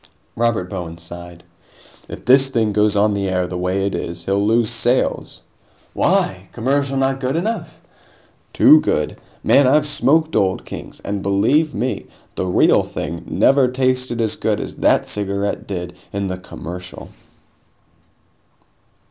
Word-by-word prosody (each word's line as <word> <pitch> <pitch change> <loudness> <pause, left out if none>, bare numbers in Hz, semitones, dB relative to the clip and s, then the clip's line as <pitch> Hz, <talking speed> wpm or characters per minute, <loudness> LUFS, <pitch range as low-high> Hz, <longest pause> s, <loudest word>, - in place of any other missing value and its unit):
Robert 115 -6 0
Bowen 85 -4 -6
sighed. 85 +1 -9 0.7
"If - - -9
this 135 +2 +5
thing 110 -5 0
goes 105 0 +2
on 105 +1 +3
the 100 -1 -1
air 90 -1 0
the 90 - -6
way 90 +2 -1
it 100 - -2
is, 85 0 -5
he'll 100 +1 +1
lose 115 +1 +2
sales." 120 +2 -1 0.5
"Why? 95 0 0
Commercial 135 +3 0
not 135 0 +1
good 130 +1 -1
enough?" 215 +7 -3 0.7
"Too 155 - +7
good! 75 - -1 0.2
Man, 140 -2 +5
I've 150 +3 +4
smoked 155 +2 +1
Old 95 -1 +1
Kings, - - -9
and, 100 -1 -3
believe 135 +11 +2
me, 125 +5 -2 0.3
the 95 - -3
real 90 - +4
thing - - -6
never 135 -1 +3
tasted 130 -1 -1
as 110 -2 -1
good - - 0
as - - -6
that - - +3
cigarette 100 0 -3
did 90 -2 -5 0.2
in 100 0 -2
the 95 -1 -3
commercial!" 90 0 -8
105 Hz, 145 wpm, -19 LUFS, 95-130 Hz, 0.7 s, Too